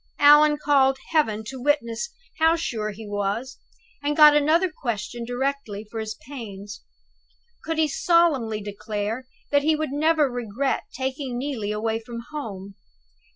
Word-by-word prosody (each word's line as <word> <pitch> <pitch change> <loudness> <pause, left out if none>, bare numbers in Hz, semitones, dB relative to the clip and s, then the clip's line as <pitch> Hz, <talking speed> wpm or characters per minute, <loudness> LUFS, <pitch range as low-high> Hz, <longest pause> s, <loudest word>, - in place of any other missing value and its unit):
Allan 295 +1 +7
called 270 -3 +3
Heaven 220 -10 +1
to 260 0 -7
witness 285 - 0 0.3
how 325 +1 +5
sure 225 -10 -2
he 215 +1 -8
was; 205 +6 -3 0.4
and 290 +1 -1
got 300 -1 +9
another 320 +5 +3
question 235 -3 -4
directly 245 -4 -3
for 225 - -4
his 215 -1 -4
pains. 210 -7 -8 0.8
Could 325 -1 -2
he 315 -1 +3
solemnly 285 -9 +2
declare 210 +4 -4 0.2
that 285 0 +4
he 310 +2 +3
would 310 -2 -3
never 305 +1 +3
regret 245 +1 -2
taking 265 -1 -3
Neelie 245 -6 -3
away 220 +1 -1
from 235 0 -8
home? 200 -10 -6
260 Hz, 140 wpm, -24 LUFS, 220-295 Hz, 0.8 s, got